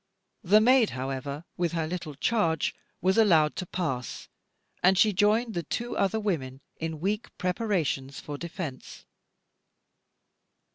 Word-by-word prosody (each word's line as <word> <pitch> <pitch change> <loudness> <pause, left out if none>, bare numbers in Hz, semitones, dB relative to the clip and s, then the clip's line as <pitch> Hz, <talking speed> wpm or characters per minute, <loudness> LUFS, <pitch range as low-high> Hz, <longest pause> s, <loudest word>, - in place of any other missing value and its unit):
The 205 +3 +6
maid, 250 -1 +5
however, 135 +4 -4
with 175 -1 0
her 165 -2 0
little 165 -3 -5
charge, 165 -1 +1 0.3
was 190 +4 +3
allowed 160 -8 +4
to 185 - -4
pass, 135 -10 -3 0.5
and 185 +1 +5
she 210 +1 +5
joined 215 +4 +2
the 175 - -1
two 240 +9 -4
other 200 +3 +1
women 140 -11 -2 0.2
in 160 -1 -4
weak 205 +6 -1
preparations 180 -8 -1
for 145 - -6
defence. 160 -4 -7
175 Hz, 130 wpm, -28 LUFS, 150-210 Hz, 0.5 s, The